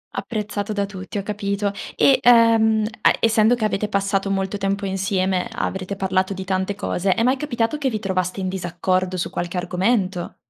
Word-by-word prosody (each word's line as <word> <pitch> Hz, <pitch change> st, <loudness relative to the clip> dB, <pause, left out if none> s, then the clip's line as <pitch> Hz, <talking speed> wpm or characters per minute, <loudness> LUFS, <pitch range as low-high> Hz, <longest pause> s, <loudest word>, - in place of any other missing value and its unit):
Apprezzato 210 Hz, -2 st, -3 dB
da 200 Hz, -1 st, 0 dB
tutti, 195 Hz, 0 st, -7 dB
ho 200 Hz, -, -2 dB
capito. 200 Hz, 0 st, -2 dB, 0.2 s
E, 270 Hz, -, +5 dB
ehm, 225 Hz, -2 st, +5 dB, 0.2 s
a -, -, +5 dB
essendo 225 Hz, +1 st, +4 dB
che 230 Hz, -3 st, -1 dB
avete 210 Hz, 0 st, -1 dB
passato 195 Hz, -1 st, 0 dB
molto 195 Hz, +1 st, -1 dB
tempo 195 Hz, +1 st, -1 dB
insieme, 190 Hz, +1 st, 0 dB
avrete 190 Hz, -3 st, -3 dB
parlato 190 Hz, 0 st, 0 dB
di 190 Hz, -, -5 dB
tante 190 Hz, +1 st, -1 dB
cose, 190 Hz, -1 st, 0 dB
è 230 Hz, -, +1 dB
mai 255 Hz, +2 st, +3 dB
capitato 255 Hz, -1 st, -1 dB
che 275 Hz, -2 st, +1 dB
vi 220 Hz, -, -2 dB
trovaste 185 Hz, -2 st, -2 dB
in 190 Hz, -, -2 dB
disaccordo 185 Hz, 0 st, -1 dB
su 175 Hz, -, -3 dB
qualche 175 Hz, +1 st, -3 dB
argomento? 185 Hz, +1 st, -1 dB
195 Hz, 175 wpm, -22 LUFS, 185-215 Hz, 0.2 s, E